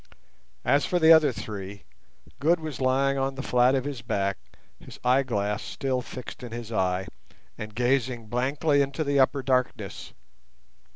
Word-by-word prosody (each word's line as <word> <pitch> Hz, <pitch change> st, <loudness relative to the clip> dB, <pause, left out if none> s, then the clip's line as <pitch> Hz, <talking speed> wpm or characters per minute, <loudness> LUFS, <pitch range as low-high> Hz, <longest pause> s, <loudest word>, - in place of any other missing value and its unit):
As 140 Hz, +1 st, +3 dB
for 180 Hz, -, 0 dB
the 165 Hz, -1 st, +7 dB
other 160 Hz, -3 st, +5 dB
three, 100 Hz, -3 st, -7 dB, 0.6 s
Good 165 Hz, +4 st, +3 dB
was 155 Hz, -4 st, -6 dB
lying 135 Hz, +1 st, +2 dB
on 135 Hz, 0 st, -1 dB
the 135 Hz, -, -5 dB
flat 125 Hz, +1 st, +3 dB
of 130 Hz, -, 0 dB
his 140 Hz, -4 st, -4 dB
back, 100 Hz, -4 st, -1 dB, 0.4 s
his -, -, -12 dB
eyeglass 120 Hz, -5 st, +1 dB
still 130 Hz, -2 st, -2 dB
fixed 125 Hz, +1 st, -9 dB
in 120 Hz, -2 st, -8 dB
his 115 Hz, -1 st, -6 dB
eye, 95 Hz, -3 st, 0 dB, 0.5 s
and 110 Hz, 0 st, -8 dB
gazing 125 Hz, -1 st, 0 dB
blankly 140 Hz, +6 st, +1 dB
into 140 Hz, +3 st, -1 dB
the 140 Hz, -1 st, +1 dB
upper 135 Hz, +1 st, +2 dB
darkness. 130 Hz, -1 st, -1 dB
130 Hz, 155 wpm, -26 LUFS, 115-140 Hz, 0.6 s, the